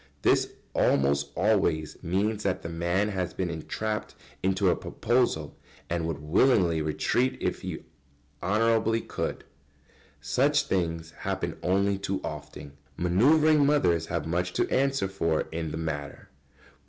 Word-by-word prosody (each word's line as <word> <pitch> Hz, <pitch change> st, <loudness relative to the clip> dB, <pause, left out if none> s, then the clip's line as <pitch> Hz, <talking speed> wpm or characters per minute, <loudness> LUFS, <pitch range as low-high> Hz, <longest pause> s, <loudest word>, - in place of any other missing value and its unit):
This -, -, +3 dB, 0.2 s
almost 70 Hz, +1 st, +2 dB
always 85 Hz, -8 st, +1 dB
means 100 Hz, +5 st, 0 dB
that 95 Hz, -3 st, -1 dB
the 85 Hz, -, -4 dB
man 85 Hz, +5 st, 0 dB
has 95 Hz, -3 st, -3 dB
been 90 Hz, -2 st, -2 dB
entrapped 105 Hz, +6 st, -4 dB, 0.3 s
into 95 Hz, 0 st, +2 dB
a -, -, +2 dB
proposal, 120 Hz, -, 0 dB, 0.4 s
and 85 Hz, -1 st, 0 dB
would 80 Hz, -3 st, -2 dB
willingly 85 Hz, -, +3 dB
retreat 120 Hz, -, 0 dB
if -, -, -2 dB
he -, -, -5 dB, 0.6 s
honourably 115 Hz, +3 st, +2 dB
could. -, -, -4 dB, 0.8 s
Such 145 Hz, +3 st, +2 dB
things 85 Hz, -3 st, -2 dB
happen -, -, -2 dB
only 100 Hz, +2 st, +1 dB
too 100 Hz, -1 st, -2 dB
often. 70 Hz, 0 st, -8 dB, 0.2 s
Manœuvring 145 Hz, -, +4 dB
mothers 90 Hz, -, +2 dB
have 85 Hz, -4 st, -2 dB
much 90 Hz, +2 st, -1 dB
to -, -, +1 dB
answer 135 Hz, -5 st, +1 dB
for 85 Hz, -5 st, 0 dB
in 80 Hz, 0 st, -3 dB
the 80 Hz, -, -5 dB
matter. 75 Hz, -3 st, -5 dB
90 Hz, 130 wpm, -27 LUFS, 80-110 Hz, 0.8 s, Manœuvring